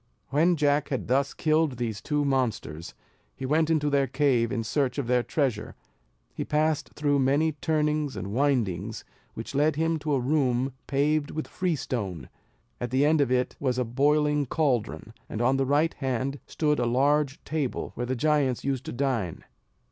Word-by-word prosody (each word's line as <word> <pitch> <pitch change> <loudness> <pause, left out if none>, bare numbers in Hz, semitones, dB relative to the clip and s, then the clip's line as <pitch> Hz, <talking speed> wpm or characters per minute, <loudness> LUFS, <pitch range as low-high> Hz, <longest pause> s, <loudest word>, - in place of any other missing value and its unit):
When 165 +6 +3
Jack 145 -1 +1
had 130 - -2
thus 135 +3 +2
killed 155 -4 +1
these 115 -4 -3
two 150 -1 0
monsters, 120 - -2 0.4
he 130 - -5
went 155 +4 +2
into 155 -2 +2
their 140 -1 +2
cave 130 -3 +2
in 115 -3 -1
search 130 +3 0
of 140 - -1
their 125 +1 +2
treasure: 120 -5 -2 0.6
he - - -3
passed 155 0 0
through 145 -1 +1
many 140 +4 +2
turnings 150 -2 0
and 95 +1 -5
windings, 115 -7 0 0.3
which - - -6
led 150 +2 +2
him 165 +1 0
to 150 0 -2
a - - +1
room 130 -1 +1
paved 145 +2 +1
with 155 - -4
freestone; 120 - -3 0.5
at 120 - -3
the 130 +4 +2
end 155 0 +4
of 135 -3 +1
it 125 0 +1
was 130 -3 0
a 125 - +1
boiling 145 +3 +2
caldron, 120 -7 -1 0.2
and 110 - -4
on 130 +3 +2
the 135 -1 0
right 150 +4 +2
hand 135 +1 -2
stood 150 -2 0
a 120 - +1
large 140 +3 +2
table 150 -4 -3
where 120 +1 -4
the 130 - -1
giants 140 -2 +1
used 135 -1 -2
to - - -5
dine. 120 - -2
140 Hz, 175 wpm, -27 LUFS, 125-150 Hz, 0.6 s, end